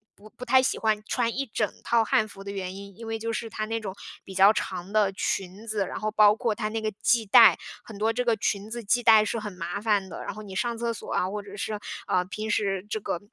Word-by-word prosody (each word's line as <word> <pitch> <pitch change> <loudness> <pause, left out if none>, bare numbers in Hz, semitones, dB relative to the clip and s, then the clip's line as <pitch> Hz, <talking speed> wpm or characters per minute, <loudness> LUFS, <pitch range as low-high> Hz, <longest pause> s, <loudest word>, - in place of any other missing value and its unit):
不 210 +1 -16
不 250 - -10
太 260 +1 +5
喜 260 - 0
欢 215 -1 +1
穿 235 -2 0
一 275 +1 -2
整 215 -2 -1
套 230 -1 +3
汉 215 0 +2
服 195 -2 -12
的 200 - -6
原 190 -2 -5
因， 200 0 -10
因 230 +2 -9
为 225 0 -2
就 230 +1 -3
是 225 +1 -4
它 215 0 -3
那 225 +1 -2
种 195 -4 -6 0.3
比 190 - -10
较 195 +3 +7
长 185 -1 -4
的 210 -2 +3
裙 195 +2 -3
子， 215 -3 -1
然 - - -5
后 215 -1 -2
包 210 -1 +6
括 230 -1 0
它 215 0 -3
那 225 +1 -2
个 215 0 -2
系 235 -2 +3
带， 195 - +8 0.3
很 220 - -11
多 220 +2 +1
这 250 +2 -1
个 235 -2 +2
裙 200 0 -2
子 235 +1 -5
系 245 +4 +3
带 220 -2 +6
是 230 - -2
很 210 -1 -6
麻 180 +3 -5
烦 205 -3 +1
的。 - - -7
然 - - -5
后 215 - -8
你 195 -2 -9
上 235 +4 -1
厕 235 0 -1
所 - - -9
啊， 180 - +1
或 205 +2 -4
者 200 0 -11
是， 210 +1 -3 0.3
呃， 180 - +2
平 215 +3 -5
时 195 -2 0
这 215 - -2
个 180 - -3
215 Hz, 290 characters per minute, -26 LUFS, 200-225 Hz, 0.3 s, 带